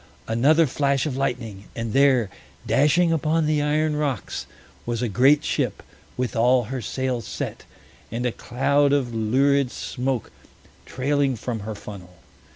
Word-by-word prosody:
Another 145 +9 +4
flash 140 -1 0
of 145 -4 -2
lightning, 120 -7 -3
and 115 -1 -4
there, 130 -7 +4 0.3
dashing 165 +4 +3
upon 160 +1 +1
the 150 -1 +1
iron 150 +1 +1
rocks, 145 -8 -3 0.4
was 120 0 -2
a - - +1
great 135 +7 +4
ship, - - -1 0.3
with 125 -1 -2
all 125 +2 +4
her 130 +3 -5
sails 130 0 -3
set, - - -5 0.5
and 120 +2 -3
a 125 - +1
cloud 140 +5 +1
of 130 -4 0
lurid 135 +5 +2
smoke 125 -1 -3 0.6
trailing 140 0 0
from 115 0 -4
her 105 +1 -6
funnel. 95 -3 -10
130 Hz, 145 wpm, -23 LUFS, 115-145 Hz, 0.6 s, Another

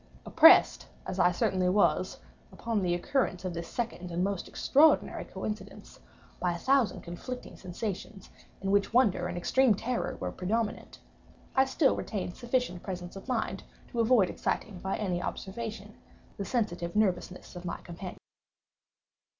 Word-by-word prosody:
Oppressed, 325 +3 +6 0.2
as 190 - -4
I 180 0 +5
certainly 180 +1 +1
was, 200 +2 +2 0.3
upon 225 -3 -2
the 175 -2 +1
occurrence 185 -2 -1
of 180 - -2
this 170 0 -5
second 225 -7 -4
and 175 +1 -1
most 195 -1 -2
extraordinary 310 +3 +3
coincidence, 210 -2 -7 0.4
by 180 -1 +1
a - - -4
thousand 265 +3 +2
conflicting 250 +9 -7
sensations, 190 +1 -6 0.3
in 195 0 -1
which 200 +3 +2
wonder 200 -8 +3
and 175 0 -5
extreme 245 +5 +3
terror 240 +5 -2
were 90 - -3
predominant, 210 - -2 0.6
I 265 0 +5
still 270 +1 +2
retained 185 -4 -4
sufficient 240 -7 -1
presence 180 -2 -6
of 195 - -10
mind 255 - -1 0.3
to 240 - -4
avoid 230 -4 +4
exciting, 200 -4 -3
by 190 +2 -2
any 180 -4 -1
observation, 210 +2 -5 0.4
the 200 - -4
sensitive 180 -8 -2
nervousness 185 -4 -1
of 175 - -7
my 170 - -3
companion. 180 +1 -8
195 Hz, 145 wpm, -30 LUFS, 180-230 Hz, 0.6 s, Oppressed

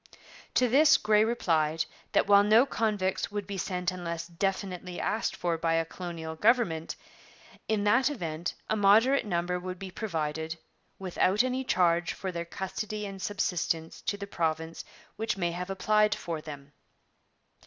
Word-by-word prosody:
' - - -20
To 250 - +4
this 295 +6 +6
Grey 210 0 +3
replied 165 -9 +1 0.3
that - - +4
while 200 0 +7
no 215 +5 +5
convicts 210 -7 -1
would 205 -1 -3
be 195 -1 -5
sent 180 -1 -1
unless 170 -2 -4
definitely 185 0 -3
asked 220 - -1
for 170 -2 -1
by 165 0 +1
a 165 0 +1
colonial 165 -2 -6
government, 205 -5 +2 0.7
in 215 -2 +1
that 240 +6 +4
event 170 - -4
a 220 - +1
moderate 220 +5 +4
number 180 -1 -1
would 185 +1 -6
be 190 0 -7
provided 160 -5 -3 0.4
'without 190 +3 +1
any 255 +1 -1
charge 175 -6 +2
for 190 - -4
their 170 -1 -4
custody 210 +4 -4
and 195 -1 -7
subsistence 180 -5 -2
to 205 - -2
the 200 - -5
province 160 -3 -2 0.3
which 220 -2 -1
may 175 -2 0
have 180 +2 -5
applied 210 +2 +2
for 165 -3 -5
them.' 145 -2 -10
185 Hz, 155 wpm, -29 LUFS, 170-210 Hz, 0.7 s, while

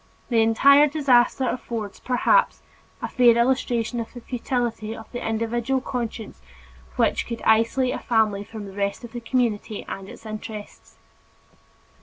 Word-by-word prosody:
The 230 -3 +3
entire 280 +6 +6
disaster 265 -3 +3
affords, 230 -5 -4
perhaps, 260 - +2 0.4
a - - 0
fair 240 -2 +4
illustration 240 -1 +1
of 230 - -5
the 245 - -8
futility 235 -3 -3
of 220 - -10
the 245 - -5
individual 230 +4 -1
conscience 235 - -5 0.5
which - - +1
would 235 - -5
isolate 230 +4 +3
a - - -4
family 215 -4 +1
from 215 0 -8
the 195 - -10
rest 200 +3 -2
of 240 - -9
the 240 - -6
community 230 -3 -1
and 195 0 -7
its 225 - -13
interests. 215 -1 -9
230 Hz, 145 wpm, -24 LUFS, 220-250 Hz, 0.5 s, entire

